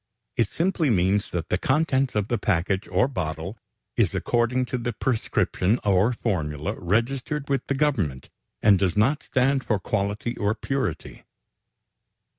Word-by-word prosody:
It 115 -4 +1
simply 170 -3 0
means 100 -1 +2
that 85 -2 -4
the 90 - +1
contents 135 -1 +1
of 105 -1 0
the 120 -2 -1
package 95 0 0
or 125 - +2
bottle 90 - -4 0.4
is - - +2
according 120 +2 +1
to 125 - +1
the 120 0 -2
prescription 110 -3 0
or 100 +3 +3
formula 75 -11 -2
registered 130 - -1
with 135 -2 0
the 140 - 0
Government, 105 - 0 0.3
and 100 -3 +6
does 95 -1 0
not 135 +8 +3
stand 130 +1 +1
for 110 - +1
quality 105 +4 -2
or 105 +1 0
purity. 135 +1 -3
110 Hz, 145 wpm, -25 LUFS, 95-130 Hz, 0.4 s, and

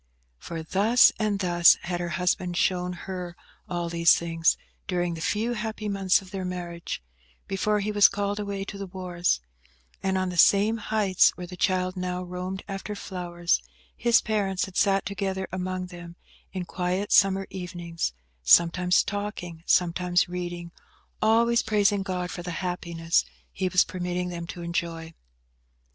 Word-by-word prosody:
For 165 -1 -6
thus 210 +9 +5
and 215 -2 +1
thus 175 -3 +5
had 175 0 -3
her 175 -1 -3
husband 180 -1 0
shown 180 0 +1
her 180 -2 -6 0.3
all 175 -1 -2
these 170 0 +5
things, 165 -1 +1 0.3
during 175 -2 -1
the 165 - -7
few 220 +7 0
happy 220 -1 -4
months 195 -1 +2
of 185 - -15
their 195 -2 -4
marriage, 175 - -5 0.4
before 210 +2 0
he 210 +2 -1
was 205 -1 +7
called 200 +1 -2
away 200 -1 -3
to 200 0 -8
the 195 - -5
wars; 180 - -1 0.6
and 190 0 0
on 185 0 0
the 180 -1 -3
same 205 +5 +5
heights 210 -4 +2
where 180 - -6
the 180 +1 -9
child 185 0 0
now 180 0 -3
roamed 180 +1 -5
after 195 +1 -5
flowers, 175 -3 -1 0.3
his 235 0 +4
parents 200 -4 0
had 190 - -12
sat 195 -1 +2
together 190 -1 -3
among 185 0 -3
them, 175 -1 -10 0.4
in 185 -2 -4
quiet 180 +3 -2
summer 195 -1 +4
evenings, 175 - -4 0.3
sometimes 175 - +5
talking, 200 -5 -5
sometimes 180 0 +2
reading, 175 -1 -5 0.5
always 235 +2 +4
praising 205 -2 +2
God 180 -2 -3
for 175 - -6
the 175 - -6 0.2
happiness 170 -2 0 0.3
He 185 -1 -2
was 180 0 +5
permitting 180 0 -3
them 170 -1 -6
to 175 0 -7
enjoy. 165 -1 -3
180 Hz, 155 wpm, -26 LUFS, 175-195 Hz, 0.6 s, was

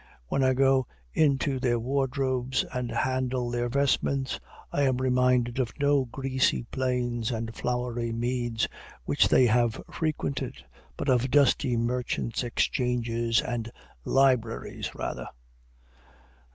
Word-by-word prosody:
When 135 - +1
I 130 0 +3
go 135 -1 +3 0.3
into 140 -2 +2
their 125 -2 +1
wardrobes 130 0 0
and 125 -1 -2
handle 130 -1 -1
their 120 0 -1
vestments, 135 0 0 0.3
I 145 - 0
am 130 -3 +2
reminded 125 -1 +2
of 120 -3 0
no 140 -1 +3
grassy 130 +1 0
plains 125 -3 -1
and 115 -1 -3
flowery 125 -1 -2
meads 120 -1 -1 0.4
which - - +3
they 130 - +5
have 120 -1 +2
frequented, 155 -4 -2 0.4
but - - -4
of 130 0 +3
dusty 135 -2 +3
merchants' 120 0 -1
exchanges 120 -2 0
and 120 -1 -4 0.3
libraries 130 -4 +1
rather. - - -4
125 Hz, 115 wpm, -27 LUFS, 120-130 Hz, 0.4 s, they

